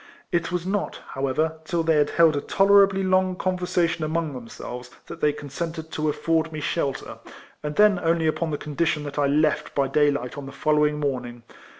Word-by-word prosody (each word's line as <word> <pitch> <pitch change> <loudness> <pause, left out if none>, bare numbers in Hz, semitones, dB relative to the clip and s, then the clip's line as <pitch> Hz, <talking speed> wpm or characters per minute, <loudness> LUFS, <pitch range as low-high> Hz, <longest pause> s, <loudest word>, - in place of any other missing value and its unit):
It 170 +1 0
was 180 -1 -2
not, 200 +2 -2
how 135 +1 -2
ever, 160 +4 -1
till 170 +1 -1
they 160 -1 +3
had 145 -1 +3
lield 165 -2 +6
a 145 - -1
tolerably 195 0 +4
long 185 0 +2
conversation 180 -3 0
among 160 -1 -1
themselves 125 0 -8 0.2
that - - -10
they 150 - +4
consented 160 +3 -6
to 155 0 -1
afford 160 +2 0
me 155 - -5
sJielter; 145 -2 -3 0.4
and 150 0 -4
then 210 -3 +5
only 165 0 +1
upon 160 +1 0
the 150 - -2
condition 150 +1 -1
that 145 0 -5
I 145 - +3
left 150 +2 +1
by 140 -1 +2
day 145 +2 +3
light 140 -1 -3
on 140 - -8
the - - -8
following 150 +1 +1
morning. 125 -4 -3
155 Hz, 195 wpm, -24 LUFS, 145-170 Hz, 0.4 s, lield